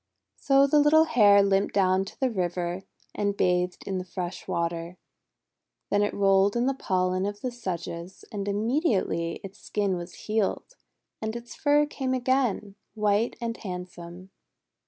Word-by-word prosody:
So 275 0 +4
the 295 +2 +4
little 300 +2 +6
Hare 205 -9 +5
limped 195 0 +1
down 190 -1 +3
to - - -12
the 260 -2 +1
river, 180 -1 -2 0.3
and 200 -1 -1
bathed 180 0 +1
in 190 -2 -2
fresh 180 -1 -6
water. 170 +1 -3 0.9
Then 205 - +3
it 205 - 0
rolled 195 +1 +3
in 240 +1 +1
the 270 - +2
pollen 185 -5 0
of 205 0 -6
the 255 - -2
sedges; 180 -5 -6
and 205 -1 -4
immediately 205 - 0
its 195 0 -10
skin 200 -3 -1
was 175 0 -9
healed, 215 - -1 0.5
and 220 +1 -3
its 235 0 -8
fur 295 0 +3
came 265 -3 -2
again, 250 -5 0 0.2
white 210 +1 +1
and 230 -1 -3
handsome. 180 -1 -8
200 Hz, 150 wpm, -27 LUFS, 180-235 Hz, 0.9 s, little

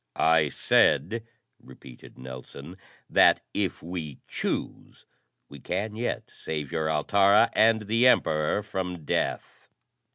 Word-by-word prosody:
"I 80 -2 +3
said," 115 - +1 0.3
repeated 65 -1 -15
Nelson, 65 +5 -10 0.3
"that, - - +4
if - - -2
we 80 -4 -6
choose, - - -5 0.4
we 70 - -12
can 100 +8 -4
yet 120 +2 -4
save 75 -3 -6
your 80 0 -1
Altara 100 +7 +3
and 110 0 +3
the 115 +4 +3
Emperor 80 -3 +2
from 90 -5 -5
death." - - -3
85 Hz, 110 wpm, -26 LUFS, 75-105 Hz, 0.4 s, that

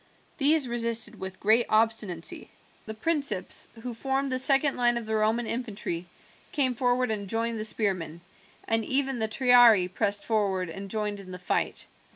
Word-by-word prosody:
These 295 -1 +5
resisted 235 -1 0
with 190 0 -7
great 225 +3 +3
obstinacy. 215 -6 -1 0.4
The 220 - -6
principes, 280 - -1
who 250 -1 -5
formed 270 +3 -2
the 255 - 0
second 275 +2 +2
line 240 -1 +2
of 235 - -5
the 220 - -4
Roman 220 +2 +1
infantry, 210 -8 -4 0.4
came 265 -4 +2
forward 245 0 0
and 200 -3 -4
joined 230 +1 -1
the - - -3
spearmen, 185 -7 -2 0.5
and 225 0 +2
even 270 +1 -1
the 220 - 0
triarii 235 -5 +5
pressed 200 +2 -1
forward 195 -5 -1
and 195 +3 -8
joined 210 -1 -2
in 190 -2 -12
the 180 - -7
fight. 180 -1 -2
225 Hz, 165 wpm, -27 LUFS, 200-250 Hz, 0.5 s, These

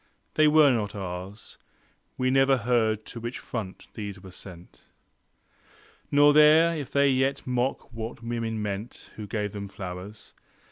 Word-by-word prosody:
They 155 0 +4
were 150 -2 +6
not 105 -4 -1
ours: 95 +2 -7 0.6
We 130 0 +1
never 135 0 +4
heard 110 -2 +1
to 120 - -8
which 120 +2 -5
front 105 -6 -6
these 100 -3 -6
were 95 0 -12
sent. 90 -2 -12 1.2
Nor 145 +1 +6
there 155 +3 +6
if 145 -4 -5
they 140 0 +4
yet 135 +2 0
mock 125 -1 -2
what 115 +1 -6
women 115 -1 -3
meant 105 +3 -6
Who 105 -1 -7
gave 105 -1 -2
them 100 -1 -6
flowers. 95 +2 -9
115 Hz, 145 wpm, -26 LUFS, 100-135 Hz, 1.2 s, were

